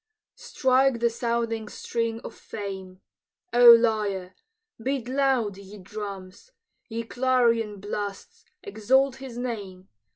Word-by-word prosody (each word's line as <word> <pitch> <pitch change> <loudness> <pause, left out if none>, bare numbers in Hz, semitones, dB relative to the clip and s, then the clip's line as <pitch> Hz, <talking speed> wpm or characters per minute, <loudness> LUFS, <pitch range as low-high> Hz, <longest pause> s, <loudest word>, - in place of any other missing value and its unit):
Strike 260 -2 +2
the 235 0 +2
sounding 230 -1 -2
string 230 -1 -3
of - - -8
fame, 190 -3 -8 0.5
O 240 0 +8
lyre! 210 -5 +4 0.5
Beat 260 0 -2
loud, 255 -6 +1
ye 200 +1 -12
drums! 195 - -8 0.4
Ye 230 +1 -3
clarion 230 -4 +1
blasts, 205 0 -6 0.2
exalt 255 +6 +1
his 265 -3 -9
name! 200 -7 -6
225 Hz, 105 wpm, -26 LUFS, 200-245 Hz, 0.5 s, O